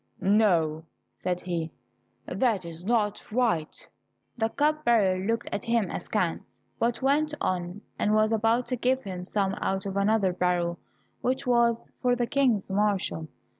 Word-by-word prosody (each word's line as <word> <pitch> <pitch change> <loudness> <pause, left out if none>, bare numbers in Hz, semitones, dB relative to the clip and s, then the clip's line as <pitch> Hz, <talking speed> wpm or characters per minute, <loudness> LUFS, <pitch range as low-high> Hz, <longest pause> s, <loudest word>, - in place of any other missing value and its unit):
"No," 175 -7 +2 0.3
said 180 -1 -3
he, 170 -3 -3 0.5
"that 225 -8 0
is 165 0 -6
not 210 -1 0
right." 220 -10 0 0.5
The 225 -2 0
cup 305 +4 +1
bearer 205 -7 +3
looked 230 +2 -1
at - - -3
him 230 -3 +1
askance, - - -2 0.3
but 235 +3 0
went 300 +3 +2
on, 180 +2 -2 0.2
and 210 +1 +2
was 215 +1 +3
about 225 +2 +2
to - - +3
give 255 +2 0
him 180 -2 -6
some 195 0 0
out 190 0 -1
of 195 0 -3
another 200 -2 +2
barrel 175 -1 0 0.4
which 260 +2 -1
was 235 -2 +2
for 245 -1 +3
the 245 -1 0
King's 245 -6 +1
marshal. 195 -5 0
210 Hz, 150 wpm, -27 LUFS, 185-240 Hz, 0.5 s, bearer